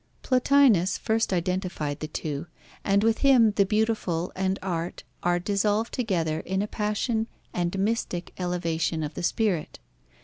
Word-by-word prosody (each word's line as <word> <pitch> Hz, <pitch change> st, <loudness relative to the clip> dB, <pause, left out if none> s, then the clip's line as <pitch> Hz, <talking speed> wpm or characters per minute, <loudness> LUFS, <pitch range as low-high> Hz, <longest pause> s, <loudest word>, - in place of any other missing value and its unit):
Plotinus 255 Hz, -8 st, +4 dB
first 225 Hz, -1 st, 0 dB
identified 180 Hz, -5 st, -2 dB
the 155 Hz, -, -4 dB
two, 150 Hz, 0 st, -4 dB, 0.4 s
and 200 Hz, +1 st, +2 dB
with 225 Hz, 0 st, +2 dB
him 255 Hz, -6 st, +5 dB
the 200 Hz, -1 st, +2 dB
beautiful 210 Hz, -5 st, 0 dB
and 190 Hz, +1 st, 0 dB
art 175 Hz, -2 st, -3 dB, 0.2 s
are 175 Hz, 0 st, +2 dB
dissolved 205 Hz, +4 st, 0 dB
together 170 Hz, -10 st, 0 dB
in 190 Hz, +4 st, -1 dB
a -, -, -3 dB
passion 220 Hz, +2 st, -1 dB, 0.3 s
and 175 Hz, +1 st, -1 dB
mystic 195 Hz, -4 st, -1 dB
elevation 165 Hz, -3 st, -1 dB
of 150 Hz, +1 st, -4 dB
the -, -, -5 dB
spirit. 185 Hz, -3 st, 0 dB
190 Hz, 140 wpm, -26 LUFS, 170-220 Hz, 0.4 s, him